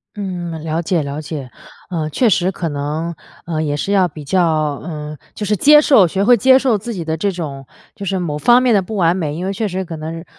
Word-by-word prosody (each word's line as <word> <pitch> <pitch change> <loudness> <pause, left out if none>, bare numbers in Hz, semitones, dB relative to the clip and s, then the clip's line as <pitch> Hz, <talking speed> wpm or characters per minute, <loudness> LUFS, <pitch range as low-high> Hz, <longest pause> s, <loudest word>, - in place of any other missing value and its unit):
嗯， 175 -5 -5
了 160 +1 -1
解 170 -1 0
了 140 +2 -5
解。 145 -4 -7 0.4
呃， 160 -4 -2
确 235 - +2
实 185 -1 +2
可 175 -2 -4
能， 155 +3 -3 0.3
呃， 160 -2 -2
也 145 -1 -1
是 200 +7 -1
要 185 -3 +3
比 150 -1 -10
较 180 +4 +2 0.4
呃， 150 -2 -6 0.2
就 210 - -4
是 210 +1 +1
接 300 +9 +7
受 270 -10 +5
学 190 +4 -1
会 245 +3 +6
接 260 +4 +5
受 255 -5 +2
自 225 +3 -6
己 170 -4 -5
的 160 - -1
这 195 +5 -1
种 145 -6 -6 0.3
就 200 -3 -7
是 190 0 -1
某 150 -4 -3
方 240 - +5
面 250 -3 +3
的 195 - +3
不 210 +3 -6
完 170 -1 +3
美。 155 -5 -3
因 180 +3 -4
为 195 - -2
确 215 +2 -2
实 185 +1 -3
可 165 - -7
能， 165 +2 -6
175 Hz, 260 characters per minute, -18 LUFS, 155-200 Hz, 0.4 s, 接